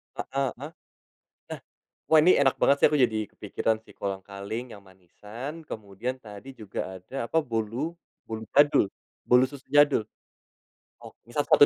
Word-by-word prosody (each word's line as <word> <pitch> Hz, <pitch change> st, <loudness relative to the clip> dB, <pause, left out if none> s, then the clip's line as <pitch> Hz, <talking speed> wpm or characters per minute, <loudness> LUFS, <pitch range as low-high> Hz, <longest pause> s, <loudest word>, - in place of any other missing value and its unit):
Heeh 135 Hz, -1 st, -1 dB
heeh. 145 Hz, -, -6 dB, 0.8 s
Nah, -, -, -7 dB, 0.5 s
wah, 160 Hz, -1 st, +7 dB
ini 180 Hz, +3 st, +6 dB
enak 135 Hz, -2 st, +4 dB
banget, 140 Hz, -, +6 dB
sih. -, -, +8 dB
Aku 150 Hz, -, +2 dB
jadi 110 Hz, -5 st, +2 dB
kepikiran 110 Hz, +2 st, -2 dB
si -, -, -18 dB
kolang-kaling 100 Hz, +4 st, -5 dB
yang 100 Hz, -, -12 dB
manisan, 105 Hz, -, -9 dB
kemudian 110 Hz, +3 st, -5 dB
tadi 105 Hz, +5 st, -10 dB
juga 100 Hz, -4 st, -6 dB
ada, 130 Hz, +6 st, -5 dB
apa, 160 Hz, -, -1 dB
bolu, 120 Hz, +4 st, -2 dB, 0.4 s
bolu 110 Hz, 0 st, -5 dB
jadul, 145 Hz, -5 st, +5 dB, 0.4 s
bolu 125 Hz, +1 st, +6 dB
susu 140 Hz, -2 st, -12 dB
jadul. 145 Hz, -6 st, +5 dB, 1.0 s
Oh, -, -, -11 dB
misal 120 Hz, +5 st, -1 dB
satu 145 Hz, -, +7 dB
120 Hz, 150 wpm, -27 LUFS, 105-140 Hz, 1.0 s, sih